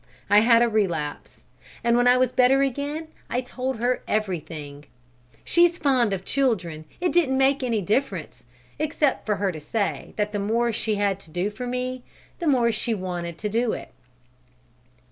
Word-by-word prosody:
I 205 - +8
had 230 +1 +5
a - - +3
relapse, 175 -10 -2 0.4
and 235 0 +3
when 245 +1 +4
I 250 0 +6
was 255 -1 +2
better 260 +2 +4
again 285 +4 -3 0.2
I 245 - 0
told 255 0 -4
her 245 +2 0
everything. 155 -8 -3 0.6
She's 345 0 +3
fond 260 -8 +2
of 190 -1 -3
children. 180 - -1
It 355 0 +1
didn't 295 -7 +3
make 270 +1 +3
any 235 -4 0
difference, 235 +9 -2 0.4
except 300 -4 0
for 210 - +2
her 195 -2 0
to 160 - -7
say 200 +7 -3
that 210 0 -1
the 205 - -2
more 230 +3 +1
she 215 0 0
had 200 -2 0
to 165 - -15
do 180 +5 -2
for 245 +4 -6
me, 250 +1 -3 0.4
the 340 - -2
more 245 -5 +3
she 230 0 -1
wanted 175 -3 -4
to 210 +4 -3
do 230 +2 +1
it." - - -7
230 Hz, 175 wpm, -24 LUFS, 200-260 Hz, 0.6 s, I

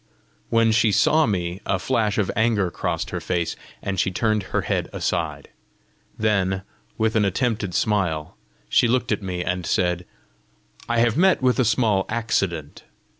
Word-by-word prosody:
When 115 -1 +3
she 110 0 +3
saw 155 +9 +4
me, 90 -2 -2
a 95 - 0
flash 110 +1 0
of 105 -4 +1
anger 105 -4 +1
crossed - - -3
her - - -2
face, 85 -2 -2 0.3
and 95 -1 -2
she - - +2
turned 110 +3 0
her - - 0
head - - -2
aside. - - -2 0.7
Then, 95 -3 +1 0.3
with 110 0 +1
an 110 - +3
attempted 100 -2 -1
smile, 90 -8 0 0.3
she - - +3
looked 125 0 0
at 105 - 0
me, 90 -2 -3
and 90 0 -2
said, 90 +1 0 0.8
"I 120 - +1
have 120 +1 +2
met 185 -5 +3
with 125 +1 +3
a 130 - +4
small 110 -4 +2
accident! 100 -9 -2
105 Hz, 160 wpm, -23 LUFS, 90-115 Hz, 0.8 s, saw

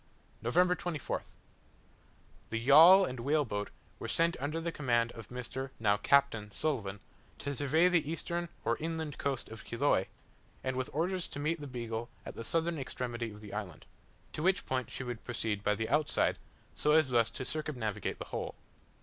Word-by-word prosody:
November 180 +10 +3
24th. 165 -7 -4 1.1
The 115 - -1
yawl 165 +10 +9
and 125 -7 -5
whale 145 +4 +2
boat 105 -3 -3 0.3
were - - -4
sent 170 +1 +2
under 150 +4 -2
the 170 +1 -2
command 120 -6 +1
of 115 - -10
Mr. 125 +2 -5
(now 105 -2 +3
Captain) 115 -2 +3
Sulivan, 105 -6 -2 0.4
to 140 - -3
survey 145 +5 +3
the 165 -5 +2
eastern 170 +1 -2 0.2
or 115 - +2
inland 160 -2 -4
coast 135 -3 -2
of 110 -2 -9
Chiloe; 115 -5 +2 0.6
and 130 0 -1
with 130 0 -2
orders 175 +4 -1
to 140 - -7
meet 155 +2 -1
the 145 - -5
Beagle 120 -2 -4 0.2
at - - -6
the 115 - -6
southern 165 +3 0
extremity 120 -3 -3
of 105 0 -11
the 105 -2 -9
island; 100 -6 -5 0.5
to 155 - -4
which 190 +3 +2
point 130 -1 -1
she - - -5
would 120 -2 -5
proceed 110 -4 -2
by 105 0 +2
the 110 +2 -2
outside, 150 +4 +2 0.3
so 150 - +2
as 155 -3 +5
thus 115 -2 +4
to 130 +3 -6
circumnavigate 120 -10 -3
the - - -6
whole. - - -4
130 Hz, 175 wpm, -32 LUFS, 115-155 Hz, 1.1 s, yawl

